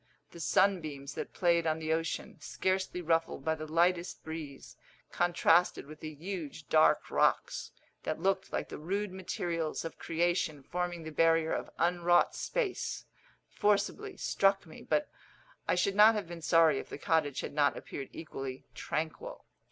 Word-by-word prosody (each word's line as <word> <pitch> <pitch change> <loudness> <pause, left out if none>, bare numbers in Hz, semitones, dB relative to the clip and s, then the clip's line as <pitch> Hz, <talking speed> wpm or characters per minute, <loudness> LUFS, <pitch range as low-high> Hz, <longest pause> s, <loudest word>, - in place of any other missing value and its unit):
The 170 - -11
sunbeams 155 -5 +1
that - - -5
played 170 -2 +2
on 155 0 +1
the 160 0 -1
ocean, 165 -1 -3
scarcely 185 0 -1
ruffled 165 -4 0
by 160 - +2
the 155 -1 -7
lightest 175 +2 +1
breeze, 155 -4 -7 0.4
contrasted 175 -1 +3
with 155 +1 -11
the 155 -1 -7
huge 160 -2 -6
dark 155 0 +4
rocks, - - +1 0.3
that 155 - -3
looked 195 0 0
like - - -2
the - - -7
rude 200 +5 -2
materials 170 -4 -3
of 165 - -7
creation 165 -3 0
forming 175 +1 -3
the 160 - -6
barrier 165 +1 +3
of - - -3
unwrought 175 +1 +3
space, 445 -7 -2 0.5
forcibly 210 - 0
struck 195 0 +2
me, 160 - -12
but 300 0 0 0.6
I - - +3
should 195 +2 +1
not 215 +2 +7
have 205 -5 -3
been 170 -1 -8
sorry 160 -4 +4
if - - -8
the - - -6
cottage 145 -2 +1
had - - -6
not 145 -1 +2
appeared 135 - -7
equally 135 -5 -7
tranquil. 160 0 -4
165 Hz, 155 wpm, -31 LUFS, 155-180 Hz, 0.6 s, not